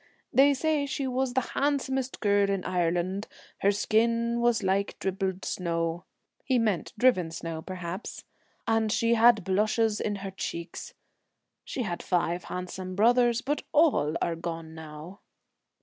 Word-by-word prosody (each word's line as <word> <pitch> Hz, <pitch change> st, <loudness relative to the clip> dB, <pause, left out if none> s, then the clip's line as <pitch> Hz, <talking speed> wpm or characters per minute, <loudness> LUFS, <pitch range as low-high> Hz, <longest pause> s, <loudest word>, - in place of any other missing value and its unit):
They 280 Hz, +1 st, +6 dB
say 300 Hz, 0 st, 0 dB
she 275 Hz, 0 st, -2 dB
was 260 Hz, 0 st, -1 dB
the 260 Hz, -, 0 dB
handsomest 270 Hz, -2 st, -1 dB
girl 205 Hz, -1 st, +3 dB
in 195 Hz, -2 st, -1 dB
Ireland, 180 Hz, +2 st, 0 dB, 0.3 s
her 200 Hz, -, +3 dB
skin 230 Hz, +3 st, +1 dB
was 235 Hz, -3 st, +2 dB
like 195 Hz, +1 st, 0 dB
dribbled 190 Hz, 0 st, -2 dB
snow 170 Hz, 0 st, -2 dB
' -, -, -51 dB
— -, -, -42 dB
he 260 Hz, -2 st, +1 dB
meant 215 Hz, -7 st, 0 dB
driven 240 Hz, -10 st, +3 dB
snow, 165 Hz, 0 st, -5 dB
perhaps, 185 Hz, +2 st, -6 dB, 0.2 s
— -, -, -40 dB
'and 225 Hz, -1 st, +2 dB
she 230 Hz, +2 st, +2 dB
had 230 Hz, -2 st, +5 dB
blushes 215 Hz, +3 st, +1 dB
in 210 Hz, -, -1 dB
her 195 Hz, -, -4 dB
cheeks. 170 Hz, -2 st, -6 dB, 0.7 s
She 255 Hz, -, -3 dB
had 175 Hz, -5 st, -3 dB
five 175 Hz, -1 st, 0 dB
handsome 185 Hz, 0 st, -5 dB
brothers, 240 Hz, +3 st, +4 dB
but 290 Hz, +2 st, -1 dB
all 280 Hz, -, +3 dB
are 170 Hz, -, -1 dB
gone 165 Hz, -1 st, -6 dB
now 160 Hz, +4 st, -10 dB
200 Hz, 150 wpm, -28 LUFS, 175-240 Hz, 0.7 s, They